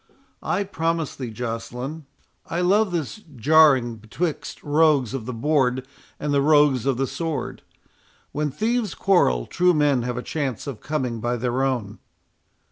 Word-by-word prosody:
I 200 - 0
promise 165 -5 -2
thee, 125 -3 -5
Joceline, 125 +6 -5 0.4
I 170 - -2
love 200 +3 +3
this 170 +2 -3 0.2
jarring 130 -3 +4
betwixt 145 +10 -4
the - - -13
rogues 145 -5 +3
of 125 -4 -4
the - - -2
board 130 0 +1 0.3
and 150 -1 -1
the 140 - +3
rogues 145 -3 +4
of 135 -3 +1
the 135 - +1
sword. 165 +3 -4 0.7
When 150 0 -1
thieves 220 - -1
quarrel, 60 - +2
true 180 -1 +2
men 145 -4 +3
have 125 0 -3
a 125 - -3
chance 135 -7 -3
of 135 -7 -6
coming 130 -6 -2
by 120 +2 -1
their 125 +2 -1
own." 120 -7 -2
140 Hz, 155 wpm, -23 LUFS, 125-160 Hz, 0.7 s, jarring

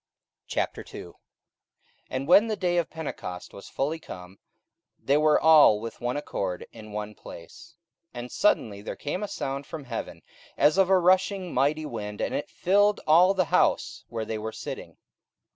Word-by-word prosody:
44:002:001 85 - -4 1.0
And 130 +2 -3
when 200 +6 +6
the 220 - -1
day 180 -3 0
of 165 - -2
Pentecost 115 - -7
was 100 - -11
fully 150 +4 -2
come, 90 - -11 0.6
they 140 - +1
were 155 0 +4
all 155 -9 +7
with 115 +1 -8
one 120 +3 -1
accord 95 -10 -4
in 110 -1 -12
one 105 0 -5
place. 105 +5 -13 0.4
44:002:002 - - -5
And 120 0 -7
suddenly 105 - +1
there - - -6
came 150 +6 -4
a 210 - -2
sound 140 -7 -4
from 155 -3 -7
heaven 120 -3 -6 0.3
as 150 +6 +4
of 190 -1 +4
a 190 - +6
rushing 185 0 +2
mighty 145 +4 +1
wind, 105 -6 -6
and - - -2
it - - -3
filled 205 +3 +2
all 180 +5 +5
the 185 -2 +2
house - - +2
where 115 -1 -4
they 110 0 -4
were 110 +1 -4
sitting. - - -8
145 Hz, 170 wpm, -26 LUFS, 110-175 Hz, 1.0 s, all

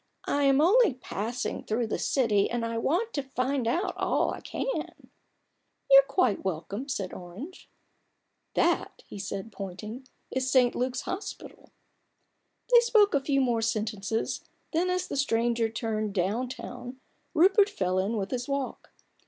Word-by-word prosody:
" - - -50
I 285 0 +1
am 275 0 +5
only 390 - +5
passing 235 -1 -4
through 230 +2 -1
the 220 - -2
city, 220 -7 +2
and 240 -1 -1
I 230 0 -2
want 360 - 0
to 285 - 0
find 265 -1 -1
out 360 - 0
all - - +1
I - - -7
can/' - - -3 0.5
" - - -21
You're 275 0 +11
quite 250 - +1
welcome," 195 - -4
said 195 -8 -3
Orange. 200 - -9 0.9
10 - - +4
A - - +6
BOOK - - +5
OF - - -2
BARGAINS. - - -11
"That," - - -20 0.3
he - - -3
added, 200 +3 -6
pointing, 210 +6 -7 0.2
"is 260 0 -1
St. 250 -2 +4
Luke's 250 0 -1
Hospital." 380 +3 -7 1.0
They 480 - +10
spoke 455 -4 +4
a 285 - +3
few 275 0 +1
more 240 -3 +1
sentences, 220 -1 -2 0.3
then 345 +3 +2
as 365 0 0
the - - -4
stranger 235 -3 +1
turned 215 -2 -2
"down 210 +8 0
town," 250 0 -8 0.4
Rupert 390 +5 +5
fell 185 - 0
in 205 +4 0
with 195 -1 -3
his 245 -1 -2
walk. 275 -2 -3
245 Hz, 170 wpm, -28 LUFS, 215-280 Hz, 1.0 s, You're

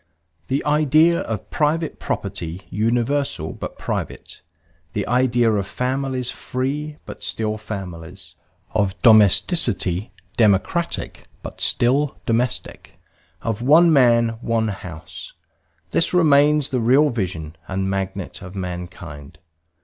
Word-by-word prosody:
The 135 +2 -1
idea 155 +3 +4
of 110 -2 -5
private 155 +1 0
property 95 -2 -4
universal 115 - 0
but - - -7
private, - - -5 0.5
the 105 - -1
idea 120 -2 +3
of 100 -2 -1
families 130 +3 -2
free 145 +4 -4
but - - -9
still 110 -1 -2
families, 95 -4 -8 0.4
of 100 -3 0
domesticity 105 - +4 0.3
democratic 110 - 0 0.2
but - - -9
still 135 +4 +2
domestic, 120 +2 -2 0.4
of 115 -1 -2
one 160 +6 +6
man 120 -4 +5
one 115 -2 0
house 90 -6 -8 0.6
this 170 - +1
remains 150 -3 +4
the 130 - 0
real 135 +6 +4
vision 85 -8 -4
and 95 0 -2
magnet 95 -1 -4
of 95 +1 -10
mankind. 90 -6 -7
115 Hz, 110 wpm, -21 LUFS, 95-140 Hz, 0.6 s, one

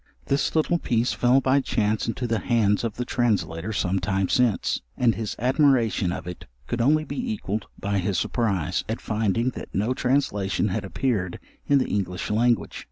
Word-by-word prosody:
This 140 +3 0
little 165 +2 +2
piece 120 -3 0
fell 125 +2 +3
by 135 +2 +3
chance 110 -4 0
into 120 +2 -2
the 115 -2 0
hands 110 -4 +2
of 115 -3 -2
the 125 - -3
translator 100 -7 0
some 95 -2 0
time 95 +1 0
since, 125 -5 +1 0.2
and 120 -2 +3
his 110 -2 -4
admiration 125 - +2
of 90 - -5
it 90 -1 -8 0.2
could 120 - -2
only 155 +5 +3
be 250 +5 -3
equalled 110 - -3
by 100 0 -1
his 95 0 -1
surprize, 100 -10 0
at 110 - -2
finding 110 +3 0
that - - -9
no 110 +6 +1
translation 105 -8 0
had 100 +3 -2
appeared 95 -2 -1 0.3
in 140 - +5
the 130 - +1
English 95 -1 -2
language. 120 +2 +1
115 Hz, 175 wpm, -25 LUFS, 100-125 Hz, 0.3 s, in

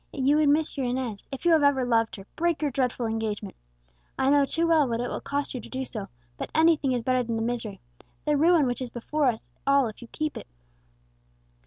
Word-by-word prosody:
If 265 -3 -3
you 290 +2 +5
would 305 -2 +4
miss 305 +1 +1
your 265 -2 0
Inez, 245 -5 -3
if 270 +5 -7
you 345 - +5
have 320 -2 +5
ever 280 -3 +3
loved 230 -2 +1
her, 195 - -11
break 335 -2 0
your 290 - +1
dreadful 250 -2 -1
engagement. 220 -2 -3 0.6
I 265 +1 +2
know 285 -1 +5
too 330 +5 0
well 315 -4 +4
what 230 -1 -2
it 245 - -2
will - - -4
cost 285 0 -3
you 250 - -4
to - - -12
do 265 0 -3
so, 215 -5 -6 0.3
but - - -5
anything 315 -4 +4
is 245 -2 -1
better 255 0 +2
than 230 -1 -3
the 225 - -1
misery 225 -4 -3 0.5
the 300 -1 +2
ruin 320 0 +4
which 245 0 -2
is 255 - -3
before 280 +5 -1
us 230 -3 -2 0.2
all 275 -1 +5
if 215 - -12
you 240 - -10
keep 310 -1 -3
it!" - - -9
260 Hz, 235 wpm, -26 LUFS, 235-295 Hz, 0.6 s, you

